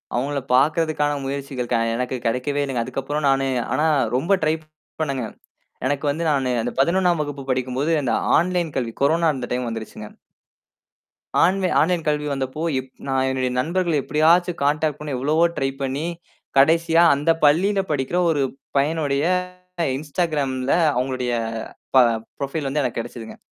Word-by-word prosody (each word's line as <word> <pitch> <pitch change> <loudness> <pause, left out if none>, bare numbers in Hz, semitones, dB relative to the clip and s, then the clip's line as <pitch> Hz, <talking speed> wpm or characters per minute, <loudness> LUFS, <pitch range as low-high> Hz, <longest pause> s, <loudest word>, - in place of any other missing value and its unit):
அவுங்கள 140 +3 -1
பாக்கிறதுக்கான 150 +1 +2
முயற்சிகள் 135 -3 -4
க - - +4 0.2
எனக்குக் 125 0 -3
கெடைக்கவே 125 +5 0
இல்லைங்க. 130 -4 -1
அதுக்கப்புறம் 145 +4 -3
நானு 135 0 +2 0.3
ஆனா 155 - +2 0.3
ரொம்ப 165 +9 -2
ட்ரை 155 +1 +2 0.5
பண்ணேங்க. 135 -6 -1 0.6
எனக்கு 145 +2 -1
வந்து 165 +4 -2
நானு 135 -3 0
அந்தப் 120 +2 -5
11ஆம் 175 +2 +2
வகுப்பு 145 -2 -6
படிக்கும்போது 130 +4 -1
இந்த 130 - 0 0.2
ஆன்லைன் 175 -2 0
கல்வி 120 -3 -1
கொரோனா 165 +3 +3
இருந்த 130 -3 -5
டைம் 125 0 -1
வந்துருச்சுங்க. 110 -1 -7 1.4
ஆன்லைன் 185 +1 +2
ஆன்லைன் 170 +1 +1
கல்வி 150 0 0
வந்தப்போ, 135 +2 -4 0.2
எப் 130 0 -8 0.2
நான் 135 -1 +1
என்னுடைய 130 -1 -1
நண்பர்கள 170 +4 0
எப்படியாச்சும் 170 +3 +3
கான்டாக்ட் 150 +1 +1
பண்ண 150 - -6
எவ்வளவோ 150 +6 +2
ட்ரை 135 - +1
பண்ணி, 135 +3 -2 0.5
கடைசியா 165 +4 +4
அந்தப் 165 +3 +1
பள்ளியில 190 +7 +4
படிக்கிற 145 +4 -1
ஒரு 150 -4 +1 0.4
பையனுடைய, 145 -1 +1 0.7
இன்ஸ்டாக்ராம்ல 145 -4 -1 0.2
அவுங்களுடைய 125 -1 -1 0.6
ப - - +8 0.4
ப்ரொஃபைல் 140 +1 -3
வந்து 150 +2 0
எனக்குக் 125 -2 -2
கெடச்சுதுங்க. 115 -1 -9
145 Hz, 140 wpm, -22 LUFS, 130-160 Hz, 1.4 s, ப